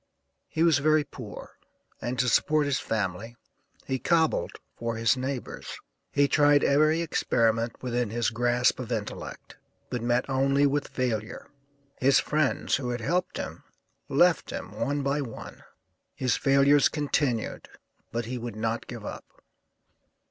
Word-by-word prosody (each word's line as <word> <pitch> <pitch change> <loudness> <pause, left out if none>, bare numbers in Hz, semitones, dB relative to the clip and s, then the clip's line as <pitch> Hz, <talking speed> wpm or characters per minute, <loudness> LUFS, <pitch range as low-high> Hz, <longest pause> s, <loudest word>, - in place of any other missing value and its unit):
He 160 - 0
was 165 -4 +4
very 155 +1 +3
poor, 120 -7 -10 0.4
and 125 +1 -3
to 125 +1 +2
support 150 +5 +3
his 140 -2 0
family 110 +2 -3 0.5
he 130 0 -2
'cobbled' 160 +1 +1 0.2
for 115 0 -3
his 115 +1 +3
neighbors. 130 0 -5 0.3
He 145 0 +3
tried 145 +1 +4
every 155 +3 +3
experiment 115 -6 0
within 120 -2 -1
his 120 +1 0
grasp 120 +2 +2
of 125 -1 -6
intellect, 110 -3 -5 0.3
but 125 - -2
met 120 +2 +1
only 135 +1 +2
with 145 +1 0
failure. 115 -4 -3 0.5
His 135 +1 +5
friends, 150 -2 +1
who 130 -3 -4
had 120 -1 -3
helped 175 +9 -1
him, - - -6 0.5
left - - +3
him - - -6
one 145 +1 -2
by 140 +2 0
one; 120 -5 -8 0.5
his 125 -3 +1
failures 140 +1 +4
continued, 145 -6 -1 0.4
but 120 0 -2
he 125 +2 -4
would 120 -2 -6
not 115 +1 -2
give - - -8
up. - - -9
130 Hz, 140 wpm, -27 LUFS, 115-145 Hz, 0.5 s, His